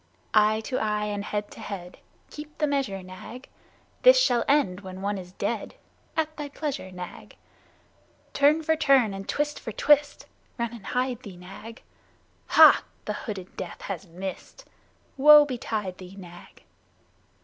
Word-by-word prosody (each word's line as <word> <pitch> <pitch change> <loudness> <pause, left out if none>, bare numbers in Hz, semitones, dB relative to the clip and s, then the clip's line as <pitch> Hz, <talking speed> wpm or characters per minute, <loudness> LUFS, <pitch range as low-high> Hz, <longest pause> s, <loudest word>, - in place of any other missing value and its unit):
Eye 215 0 +4
to 255 +3 -3
eye 210 -1 -1
and 205 -1 -3
head 210 0 -4
to - - -12
head, 180 -3 -8 0.3
(Keep 300 0 -10
the 305 - +1
measure, 270 -10 -2
Nag.) 185 +8 -10 0.5
This - - +7
shall 245 - +3
end 275 -11 +2
when 190 0 -9
one 200 0 -1
is 180 0 -11
dead; - - -3 0.4
(At 315 -1 -1
thy 295 -1 -5
pleasure, 280 -9 -5
Nag.) 180 -1 -9 1.0
Turn 300 +3 +3
for 320 +1 +2
turn 275 -9 +3
and 195 0 -8
twist 295 0 -1
for 225 - -6
twist 290 +5 +2 0.3
(Run 235 -1 -2
and 230 -4 -10
hide 250 -1 -1
thee, 200 -7 -10
Nag.) 195 +6 -11 0.6
Hah! - - +8 0.2
The - - -2
hooded 195 -4 -7
Death 185 - -7
has 195 -1 -6
missed! 190 - -8 0.5
(Woe 295 +2 +9
betide 220 -8 -4
thee, 185 +1 -11
Nag!) 175 -3 -13
220 Hz, 150 wpm, -26 LUFS, 190-285 Hz, 1.0 s, Woe